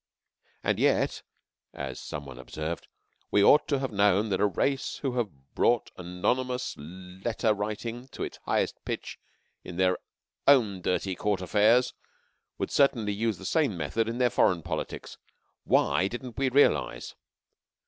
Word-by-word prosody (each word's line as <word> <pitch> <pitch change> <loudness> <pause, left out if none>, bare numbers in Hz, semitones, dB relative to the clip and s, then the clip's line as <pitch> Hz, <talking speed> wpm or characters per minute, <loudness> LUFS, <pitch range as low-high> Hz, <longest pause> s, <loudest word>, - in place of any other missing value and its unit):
"And - - +1
yet," - - +2 0.5
as 65 -2 -5
some 75 -1 -6
one 65 -2 -10
observed, 80 +6 -5 0.4
"we 100 - +4
ought 150 +7 +6
to 140 - +1
have 135 -2 -3
known 105 +1 +3
that 95 - 0
a 105 - +5
race 135 +8 -1
who 130 -3 -1
have 75 - -4
brought 120 -1 +2
anonymous 125 +9 -1
letter 95 +8 -2
writing 110 +4 -4
to - - -6
its - - -6
highest - - 0
pitch - - -5 0.4
in 90 -1 -8
their 90 -1 +2 0.5
own 110 -9 +5
dirty 95 +1 0
Court 100 +1 0
affairs 105 +7 +3 0.6
would - - -3
certainly 115 -7 +3
use 110 -1 -1
the - - -10
same 145 - +1
methods 110 +9 -1
in 115 - -3
their 125 -1 +3
foreign 85 -3 +3
politics. - - -5 0.5
Why 80 +7 +3
didn't 120 +2 -7
we 135 -1 +2
realize?" 140 +3 +2
105 Hz, 150 wpm, -28 LUFS, 90-120 Hz, 0.6 s, ought